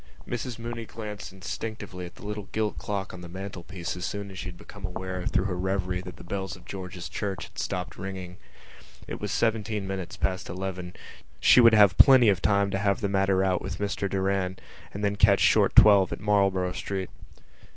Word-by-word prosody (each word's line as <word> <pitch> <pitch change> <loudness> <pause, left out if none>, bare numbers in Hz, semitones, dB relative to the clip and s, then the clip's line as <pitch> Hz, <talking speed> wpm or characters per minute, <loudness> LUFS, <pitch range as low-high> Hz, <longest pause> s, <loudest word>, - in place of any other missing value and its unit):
Mrs 120 0 -4
Mooney 115 0 -5
glanced 105 -3 -7
instinctively 95 -1 -6
at 85 - -15
the - - -12
little 105 -1 -5
gilt 110 -1 -1
clock 100 -2 -4
on 90 - -9
the 85 - -9
mantelpiece 95 -1 -6
as 90 - -6
soon 100 0 -4
as 95 - -8
she - - -5
had 90 -1 -8
become - - -13
aware 95 0 -4
through - - +1
her 95 -2 -1
revery 90 0 -1
that 90 -2 -9
the - - -12
bells 95 +2 -4
of 90 - -16
George's 90 -2 -7
Church 100 -3 -4
had - - -10
stopped 90 0 -4
ringing. 95 -1 -6 0.7
It - - -6
was - - -3
seventeen 110 -2 0
minutes 95 -2 -5
past 95 -1 -2
eleven: 90 0 -5 0.4
she 125 - +7
would 115 -1 +7
have 100 -3 +7
lots 130 -2 +8
of 100 -6 +4
time 100 -1 +2
to 95 - -1
have 100 +3 +1
the 100 - 0
matter 95 -1 +2
out 95 -2 +1
with - - -5
Mr 100 -1 -2
Doran 95 -1 0 0.3
and 100 - -6
then 100 0 0
catch 100 -1 +5
short - - +4
twelve 100 -3 +7
at - - -4
Marlborough 100 -3 +2
Street. 95 -2 -4
95 Hz, 200 wpm, -27 LUFS, 90-105 Hz, 0.7 s, lots